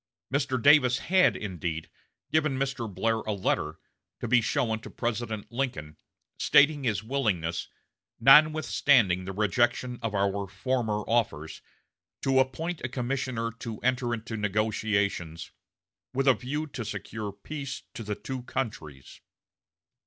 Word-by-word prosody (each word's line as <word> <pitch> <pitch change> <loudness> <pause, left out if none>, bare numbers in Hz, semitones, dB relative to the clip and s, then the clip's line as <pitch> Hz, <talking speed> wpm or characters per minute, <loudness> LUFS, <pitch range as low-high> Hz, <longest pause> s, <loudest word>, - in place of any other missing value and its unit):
Mr. 135 -2 +1
Davis 130 -1 +6
had, 185 +1 +3
indeed, 85 -5 -4 0.4
given 150 -4 +2
Mr. 135 -5 -2
Blair 115 +5 0
a 110 - -3
letter, 85 -5 -1 0.4
to - - -3
be 125 +1 +4
shown 115 -2 0
to - - -10
President 115 -2 -3
Lincoln, 115 - -3 0.4
stating 145 0 +5
his 105 -3 0
willingness, 105 -10 -1 0.5
"notwithstanding 135 - +5
the 95 - -4
rejection 120 +4 +1
of 115 -2 -2
our 100 0 0
former 110 +1 -1
offers," 105 -9 -1 0.6
to 135 -1 +3
appoint 160 +6 -1
a 130 - -2
commissioner 125 -2 -2
to 115 -3 -6
enter 125 -1 +1
into 115 -1 -4
negotiations 100 -5 -1 0.6
"with 135 +1 +1
a 130 - +8
view 145 +5 -3
to 140 -5 -6
secure 110 -1 -5
peace 135 +7 -7
to - - -7
the 105 -1 -3
two 130 +3 -6
countries." 80 - -6
115 Hz, 130 wpm, -28 LUFS, 100-135 Hz, 0.6 s, a